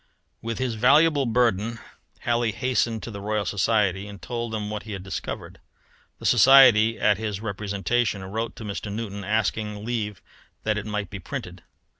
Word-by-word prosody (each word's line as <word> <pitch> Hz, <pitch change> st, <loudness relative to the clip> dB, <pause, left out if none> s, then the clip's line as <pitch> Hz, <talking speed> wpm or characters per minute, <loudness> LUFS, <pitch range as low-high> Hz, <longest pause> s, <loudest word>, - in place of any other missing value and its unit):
With 115 Hz, 0 st, -4 dB
his 130 Hz, -2 st, -1 dB
valuable 140 Hz, +5 st, +4 dB
burden 115 Hz, -1 st, +1 dB, 0.4 s
Halley 120 Hz, -1 st, +1 dB
hastened 115 Hz, 0 st, 0 dB
to 120 Hz, -, -6 dB
the 100 Hz, -1 st, -7 dB
Royal 105 Hz, 0 st, -1 dB
Society 100 Hz, -1 st, +1 dB
and 100 Hz, -1 st, -10 dB
told 115 Hz, +6 st, -4 dB
them 105 Hz, -1 st, -3 dB
what 105 Hz, -1 st, -4 dB
he 105 Hz, 0 st, -8 dB
had 95 Hz, -2 st, -6 dB
discovered. 95 Hz, -, -6 dB, 0.6 s
The -, -, -11 dB
Society 120 Hz, -5 st, +7 dB
at 105 Hz, -1 st, +3 dB
his 105 Hz, -3 st, -3 dB
representation 100 Hz, +1 st, -1 dB
wrote 110 Hz, +4 st, -4 dB
to -, -, -9 dB
Mr. 100 Hz, 0 st, -5 dB
Newton 100 Hz, -2 st, -5 dB
asking 105 Hz, 0 st, -1 dB
leave 105 Hz, -4 st, -3 dB, 0.4 s
that 105 Hz, -1 st, 0 dB
it 105 Hz, -, -7 dB
might 105 Hz, -3 st, -3 dB
be 100 Hz, -, -6 dB
printed. 85 Hz, -, -7 dB
110 Hz, 165 wpm, -25 LUFS, 100-115 Hz, 0.6 s, Society